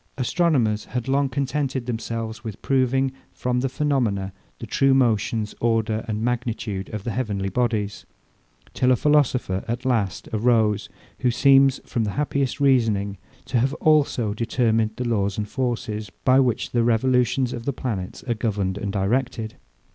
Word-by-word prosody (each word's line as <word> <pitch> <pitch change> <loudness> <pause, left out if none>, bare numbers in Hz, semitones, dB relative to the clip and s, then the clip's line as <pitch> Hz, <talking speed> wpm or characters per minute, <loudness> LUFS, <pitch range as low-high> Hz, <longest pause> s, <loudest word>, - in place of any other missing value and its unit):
Astronomers 130 -6 +1
had 125 +1 -4
long 135 +1 +2
contented 135 -1 -2
themselves 115 -1 -4
with 110 -4 -7
proving, 135 0 +2 0.2
from 125 0 -1
the 135 +1 0
phaenomena, 120 -10 0 0.2
the - - -7
true 135 +5 +3
motions, 110 -3 +1
order, 110 -1 +1
and 110 0 -2
magnitude 115 -5 -2
of 105 -2 -5
the 120 - -3
heavenly 100 -5 -2
bodies: 105 -2 -1 0.7
Till 130 0 +2
a - - +6
philosopher, 130 -9 +2
at 120 +2 -3
last, 110 -8 0
arose, 110 -2 +2 0.3
who 125 - +2
seems, 135 +2 +5
from 115 - -1
the 105 - -2
happiest 140 -2 -1
reasoning, 110 -8 +2 0.3
to 125 - 0
have 135 +5 +1
also 140 -10 +2
determined 115 -1 +1
the 125 - -3
laws 100 -4 0
and 105 -1 -2
forces, 110 -4 -3 0.2
by 130 +1 +6
which 125 -4 +1
the 120 -1 +2
revolutions 125 +2 +2
of 120 -1 -6
the 140 - +1
planets 105 -7 -4
are 120 - -1
governed 100 -3 -2
and 100 -1 -3
directed. 110 +3 -1
120 Hz, 155 wpm, -23 LUFS, 110-130 Hz, 0.7 s, a